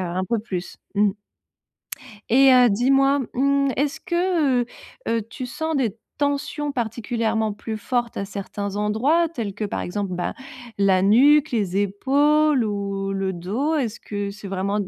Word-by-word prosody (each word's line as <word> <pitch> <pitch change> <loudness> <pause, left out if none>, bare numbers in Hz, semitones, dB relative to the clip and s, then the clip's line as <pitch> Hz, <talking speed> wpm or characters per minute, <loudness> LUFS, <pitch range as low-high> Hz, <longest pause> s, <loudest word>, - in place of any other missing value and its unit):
un 180 +1 -2
peu 230 +1 -1
plus. 190 -5 -6 0.2
Mmh 205 0 +4 1.2
et 265 +3 +6
heu, 250 -1 +6
dis-moi, 270 +6 +3
mmh 275 +1 +2
est-ce 285 +1 -1
que, 345 -8 +1
heu 240 - -2 0.4
heu, 230 -1 +1
tu 255 - -6
sens 315 +6 -3
des 235 -7 0 0.2
tensions 285 +1 -1
particulièrement 225 -2 -1
plus 220 +1 -5
fortes 240 +1 -2
à - - -2
certains 200 0 -5
endroits, 255 +12 +2
tels 230 - -5
que 210 +1 -3
par - - -3
exemple 195 0 -3
bah, 175 - -2 0.4
la 195 -2 +3
nuque, 280 +9 +5
les 200 -6 -1
épaules 280 +7 +2
ou 200 -2 -3
le 195 -1 -1
dos? 215 - -1
Est-ce 245 -8 -2
que 205 -1 -4
c'est 200 0 -10
vraiment 195 +2 -1
d 195 - -3
230 Hz, 155 wpm, -23 LUFS, 200-275 Hz, 1.2 s, et